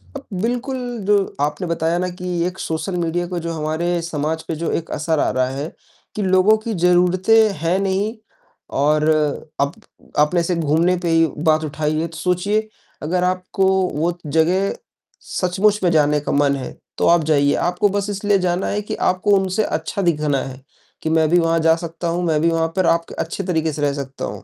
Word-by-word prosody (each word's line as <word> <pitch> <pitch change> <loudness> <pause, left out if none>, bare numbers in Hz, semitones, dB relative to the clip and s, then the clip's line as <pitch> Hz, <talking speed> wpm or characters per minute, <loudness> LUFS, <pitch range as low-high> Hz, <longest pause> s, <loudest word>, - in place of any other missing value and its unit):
अब - - -6 0.2
बिल्कुल 245 +4 -1 0.3
जो 205 -1 +5 0.2
आपने 150 +5 -1
बताया 165 0 0
ना 180 - -1
कि 180 - -5 0.2
एक 185 +1 -6
सोशल 160 +3 -3
मीडिया 175 +1 -1
को 175 -1 -3
जो 170 0 -4
हमारे 165 +3 -1
समाज 160 -1 -3
पे 165 - -2
जो 165 +2 -2
एक 165 - -13
असर 155 +1 0
आ - - +2
रहा 130 0 +1
है, 140 +4 -5 0.4
कि 210 - -2
लोगों 190 +2 +4
की 220 +1 -4
ज़रूरतें 180 +5 +4
हैं 170 +3 +1
नहीं, 195 +4 -1 0.5
और 150 +2 +2 0.5
अप 140 +1 +1 0.5
आपने 150 +4 +3
ऐसे 170 +1 0
घूमने 165 +3 +2
पे 170 - 0
ही 165 0 +4 0.2
बात 155 0 +3
उठाई 155 +1 -1
है, 165 - -1
तो 160 -1 -11
सोचिए, 195 +6 0 0.4
अगर 180 +4 0
आपको 185 +1 0 0.3
वो 170 +4 -1
जगह 165 +6 +1 0.5
सचमुच 200 +3 +1
में 180 - +4
जाने 150 -2 +3
का - - -3
मन 140 -1 +2
है, 130 -2 -7 0.2
तो - - +2
आप 170 -2 +5
जाइए, 145 -2 +3
आपको 180 +4 +1
बस 200 +1 -2
इसलिए 205 0 +1
जाना 180 0 0
है 205 +1 -1
कि 210 - -5 0.2
आपको 185 +3 -1
उनसे 190 +3 0
अच्छा 160 +3 -2
दिखना 150 -5 +1
है, 130 0 -8 0.4
कि 160 - -1
मैं 160 -1 +3
भी 175 - +4
वहाँ 165 0 +2
जा 160 0 +4
सकता 165 0 -5
हूँ, 175 +1 -1
मैं 155 -3 +1
भी 165 - +3
वहाँ 165 0 +1
पर 185 -2 +2
आप 170 0 +2
क - - -9
अच्छे 170 +4 -3
तरीक़े 160 -3 0
से 145 - -5
रह 145 -1 +1
सकता 135 -1 -5
हूँ, - - -7
170 Hz, 200 wpm, -20 LUFS, 155-185 Hz, 0.5 s, जो